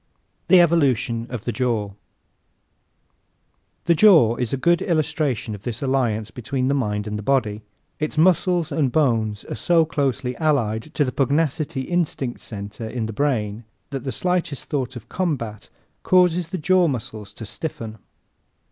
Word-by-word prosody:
The 185 - +7
Evolution 135 -9 +2
of 120 -3 -6
the 120 - 0
Jaw 115 -5 -1
¶ 100 - -17 1.9
The 170 - +5
jaw 160 - +6
is 125 -3 -2
a 135 - 0
good 170 +5 +2
illustration 150 - 0
of 105 - -8
this 120 +3 -4
alliance 115 -5 0
between 130 +3 -2
the - - +2
mind 105 -6 -1
and 105 0 -4
the - - -4
body. 110 -3 0 0.4
Its 155 0 -3
muscles 175 0 +3
and 140 -3 +1
bones 115 -8 +1
are - - -5
so 165 +8 +3
closely 135 -5 -1
allied 135 -5 0
to 145 - +2
the 130 - -2
pugnacity 145 +1 0
instinct 145 -5 -2
center 105 +1 -7
in 115 -1 -3
the 110 - -5
brain 110 -4 -1 0.3
that 135 -2 -4
the 130 - -3
slightest 180 0 -2
thought 135 -2 -2
of 120 - -9
combat 130 - -3 0.3
causes 180 -2 +3
the 185 - -4
jaw 185 +2 +3
muscles 110 -6 -5
to 115 - -8
stiffen. 110 -3 -6
130 Hz, 155 wpm, -22 LUFS, 110-155 Hz, 1.9 s, The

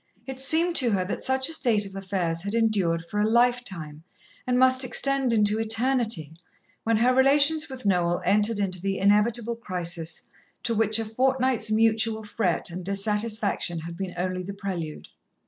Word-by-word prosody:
It 265 0 -7
seemed 330 +5 +3
to 250 -4 +4
her 185 -2 0
that 190 - -5
such 265 0 +1
a 325 - -1
state 225 -9 +1
of 195 0 -10
affairs 180 -4 -3
had 200 +4 -4
endured 195 -8 0
for 210 - -4
a 215 - +1
lifetime, 225 -11 0 0.5
and 250 0 +1
must 260 +1 +4
extend 270 0 +1
into 210 -1 +2
eternity, 225 - 0 0.5
when 225 -1 +1
her 245 +3 +3
relations 285 +4 +4
with 260 -3 -8
Noel 175 -3 +1
entered 210 +2 +2
into 185 -3 -2
the 195 0 -2
inevitable 215 +4 +2
crisis 175 -6 -3 0.4
to 235 - 0
which 220 -1 +2
a 225 - -2
fortnight's 255 0 0
mutual 220 0 +1
fret 205 -5 -1
and 180 +2 -7
dissatisfaction 205 -2 -1
had 170 +1 -8
been 185 0 -6
only 185 +1 -3
the 195 +2 -7
prelude. 175 -6 -6
215 Hz, 165 wpm, -25 LUFS, 185-245 Hz, 0.5 s, to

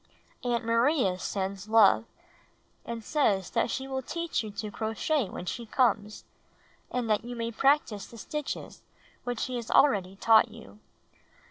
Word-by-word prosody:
Aunt 240 -2 0
Maria 230 - +2
sends 195 +2 -4
love 220 0 +6 0.8
and 230 -1 -5
says 210 - +1
that - - +1
she 265 +3 -3
will 265 -1 -3
teach 335 +5 -2
you 215 - -6
to 210 +1 -5
crochet 225 +3 -1
when 175 - -7
she 235 +6 -5
comes 215 -4 +1 0.3
— - - -34
and 250 -2 -1
that 215 0 +1
you 245 +1 -6
may 230 0 -3
prac 275 +6 +4
tice 205 -3 -7
the 230 - -13
stitches 300 +5 -5 0.4
which 245 -2 -3
she 255 -1 -2
has 235 -2 -6
already 195 -9 +3
taught 220 +3 +5
you. 220 -2 -14
230 Hz, 160 wpm, -28 LUFS, 210-255 Hz, 0.8 s, love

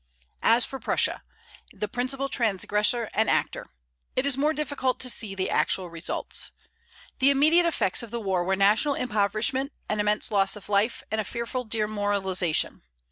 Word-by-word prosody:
As 230 +2 +4
for 270 - -7
Prussia, - - 0 0.5
the 210 - -4
principal 260 +5 -1
transgressor 220 0 +2
and 220 +1 +1
actor, - - 0 0.5
it 255 - +1
is 280 -2 +3
more 295 +3 +2
difficult 285 -4 -2
to 255 - +3
see 205 -4 -3
the 190 0 -2
actual 180 -3 +1
results. 165 0 -3 0.7
The 265 +1 +5
immediate 310 +5 +4
effects 240 - +1
of 235 - -8
the 235 - -4
war 190 -4 0
were 190 +2 +1
national 210 +9 +3
impoverishment, 225 +4 0 0.2
an 215 - -1
immense 210 +1 0
loss 195 -1 +2
of 210 - -12
life, 210 +3 +1
and 220 0 0
a - - -4
fearful 235 +4 -4
demoralization. 205 -5 0
220 Hz, 160 wpm, -26 LUFS, 200-260 Hz, 0.7 s, The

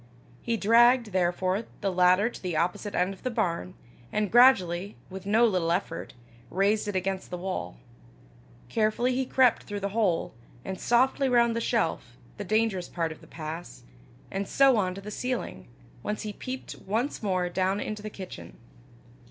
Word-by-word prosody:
He 235 -1 -1
dragged, 235 +2 +5
therefore, 185 +3 0 0.2
the 200 -2 0
ladder 180 +3 +4
to 240 - -7
the 180 -4 -2
opposite 180 +5 -1
end 180 +2 +1
of 190 - -15
the 255 - -2
barn, 165 - -2 0.4
and 210 -2 -1
gradually, 200 -7 +4 0.2
with 190 +1 -8
no 225 +3 +5
little 180 -6 +1
effort, 175 -5 -3 0.3
raised 205 +3 +1
it 205 - -3
against 190 0 -2
the 180 - -4
wall. 175 - -4 0.9
Carefully 230 +3 +1
he 260 0 -1
crept 255 -3 +4
through 205 0 -6
the 200 - -1
hole, 200 -5 0 0.3
and 190 -1 -5
softly 260 +3 +2
round 235 -2 +3
the 230 - -1
shelf, 160 - -1 0.2
the 205 - -4
dangerous 210 -3 0
part 165 -2 -2
of 160 - -10
the - - -15
pass, 160 +2 -7 0.5
and 195 0 -3
so 270 -2 +5
on 185 -3 0
to 195 - -7
the 210 +1 -8
ceiling, 250 - -4 0.3
whence 210 +8 -3
he 210 -1 -4
peeped 260 +3 -7
once 230 +8 -1
more 185 -4 0
down 190 +2 0
into 215 0 -4
the 215 - -5
kitchen. 190 -3 -9
200 Hz, 170 wpm, -27 LUFS, 180-230 Hz, 0.9 s, dragged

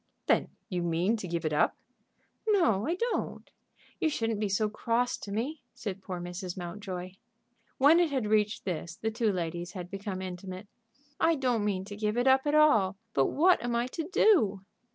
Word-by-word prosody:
"Then - - +3 0.2
you 180 -5 -2
mean 175 +5 +1
to 195 - -6
give 170 -1 -3
it 155 - 0
up?" 150 - +2 0.7
"No, 330 - +3
I 335 - +1
don't. 470 +5 -2 0.5
You 320 - +2
shouldn't 225 -7 -1
be 210 -1 0
so 205 +2 +1
cross 235 +3 0
to 200 - -8
me," 260 +9 -3
said 200 -2 -5
poor 185 -2 -5
Mrs. 175 +1 -6
Mountjoy. 185 0 -6 0.7
When 295 +5 +6
it 345 -2 +3
had 265 -6 -1
reached 210 +1 +1
this 170 -2 -3
the 220 +4 -2
two 225 -1 +1
ladies 175 0 -3
had 180 -2 -7
become 195 -1 -4
intimate. 185 +1 -7 0.5
"I 330 0 +4
don't 250 -6 0
mean 195 -2 -1
to 205 0 -8
give 210 +1 -1
it 245 - +2
up 265 +2 +4
at 295 - +2
all; 215 -11 +4 0.2
but 135 - +3
what 355 +1 +4
am 240 -1 -1
I 235 +1 +1
to 325 0 -4
do?" 225 - +4
210 Hz, 190 wpm, -29 LUFS, 185-255 Hz, 0.7 s, When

